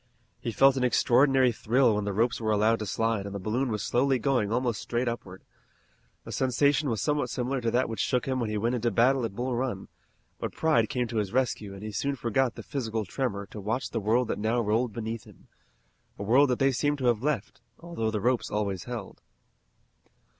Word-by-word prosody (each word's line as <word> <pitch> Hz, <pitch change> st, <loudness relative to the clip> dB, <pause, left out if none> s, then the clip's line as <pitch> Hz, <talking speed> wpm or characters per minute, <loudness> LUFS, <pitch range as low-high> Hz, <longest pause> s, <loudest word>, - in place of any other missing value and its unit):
He 115 Hz, -, -3 dB
felt 135 Hz, +4 st, +5 dB
an 130 Hz, -, 0 dB
extraordinary 130 Hz, +1 st, +4 dB
thrill 115 Hz, +2 st, +2 dB
when 105 Hz, 0 st, -1 dB
the 100 Hz, -, -1 dB
ropes 115 Hz, +4 st, 0 dB
were 110 Hz, -, -1 dB
allowed 110 Hz, +2 st, +3 dB
to 105 Hz, -, -4 dB
slide 110 Hz, -1 st, -1 dB
and 100 Hz, -, -7 dB
the -, -, -3 dB
balloon 120 Hz, +7 st, -1 dB
was 105 Hz, -2 st, -2 dB
slowly 135 Hz, +2 st, +2 dB
going 125 Hz, -4 st, 0 dB
almost 120 Hz, -2 st, 0 dB
straight 120 Hz, +1 st, -2 dB
upward. 95 Hz, -6 st, -5 dB, 0.8 s
The -, -, -9 dB
sensation 140 Hz, +3 st, +2 dB
was 110 Hz, -3 st, -1 dB
somewhat 150 Hz, -1 st, 0 dB
similar 130 Hz, +1 st, -2 dB
to 115 Hz, -, 0 dB
that 125 Hz, +3 st, +1 dB
which 115 Hz, -, -5 dB
shook 125 Hz, -1 st, +1 dB
him 130 Hz, -1 st, 0 dB
when 115 Hz, -3 st, -1 dB
he 105 Hz, -, -2 dB
went 115 Hz, +4 st, 0 dB
into 120 Hz, -1 st, 0 dB
battle 120 Hz, +4 st, +3 dB
at 100 Hz, -, -5 dB
Bull 125 Hz, +2 st, -2 dB
Run, 120 Hz, -6 st, -3 dB, 0.5 s
but -, -, -4 dB
pride 120 Hz, -9 st, +2 dB
came 125 Hz, -1 st, 0 dB
to 115 Hz, -, -3 dB
his 105 Hz, -3 st, -1 dB
rescue 115 Hz, -5 st, -1 dB
and 95 Hz, -, -10 dB
he 110 Hz, -, -5 dB
soon 140 Hz, +7 st, -1 dB
forgot 125 Hz, 0 st, 0 dB
the -, -, -8 dB
physical 115 Hz, -6 st, -3 dB
tremor 100 Hz, -2 st, -3 dB
to 105 Hz, -, -7 dB
watch 115 Hz, +6 st, -2 dB
the 115 Hz, -, -1 dB
world 110 Hz, +4 st, +1 dB
that -, -, -2 dB
now 110 Hz, +3 st, +1 dB
rolled 115 Hz, +2 st, +1 dB
beneath 115 Hz, 0 st, -5 dB
them, -, -, -18 dB, 0.7 s
a -, -, -5 dB
world 130 Hz, +7 st, +4 dB
that 125 Hz, -, +1 dB
they 135 Hz, 0 st, +3 dB
seemed 145 Hz, +3 st, 0 dB
to 130 Hz, -, -3 dB
have 120 Hz, -3 st, +2 dB
left, 140 Hz, -7 st, -2 dB, 0.2 s
although 165 Hz, -10 st, -3 dB
the 110 Hz, -1 st, -2 dB
ropes 125 Hz, +2 st, +1 dB
always 100 Hz, -4 st, -2 dB
held. 120 Hz, -5 st, -7 dB
120 Hz, 220 wpm, -28 LUFS, 110-130 Hz, 0.8 s, felt